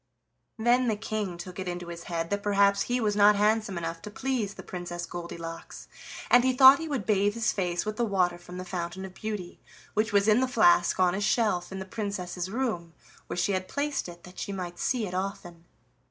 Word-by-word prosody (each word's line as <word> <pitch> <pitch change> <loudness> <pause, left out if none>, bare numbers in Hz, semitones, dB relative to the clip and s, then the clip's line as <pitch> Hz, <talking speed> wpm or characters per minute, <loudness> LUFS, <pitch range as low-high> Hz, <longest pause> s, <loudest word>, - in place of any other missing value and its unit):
Then 240 +3 +3
the 220 - +1
King 210 -4 -3
took 180 +2 -8
it 185 - -4
into 175 -1 -5
his 170 0 -8
head 165 0 -3
that 205 0 0
perhaps 200 -1 +3
he 245 +1 0
was 210 -3 0
not 205 0 +6
handsome 210 -2 +1
enough 165 0 -4
to 210 - -7
please 225 -3 -2
the - - -9
Princess 175 -1 -5
Goldilocks, 170 -1 -8 0.4
and 245 0 +7
he 260 0 +3
thought 265 +1 +9
he 325 - -4
would 270 -9 -2
bathe 205 0 +2
his 230 0 +1
face 175 -2 -1
with 215 0 -3
the 240 - +1
water 180 -5 +1
from 175 +1 -10
the 185 - -6
Fountain 175 +1 -4
of 190 - -10
Beauty, 205 -4 -6 0.3
which 215 +1 +1
was 200 0 +3
in 215 +2 +5
the 260 - +2
flask 180 -9 +4
on 180 -1 +4
a 195 - -2
shelf 205 -5 +1
in 190 - -5
the 190 - -5
Princess's 190 -3 -4
room, 200 -8 -2 0.3
where - - -5
she 175 +3 +1
had 185 -1 -1
placed 285 -7 -2
it 175 0 -12
that 180 0 -12
she - - -4
might 180 -3 -5
see 245 -4 0
it 180 - -6
often. 180 -3 -5
195 Hz, 220 wpm, -28 LUFS, 175-215 Hz, 0.4 s, thought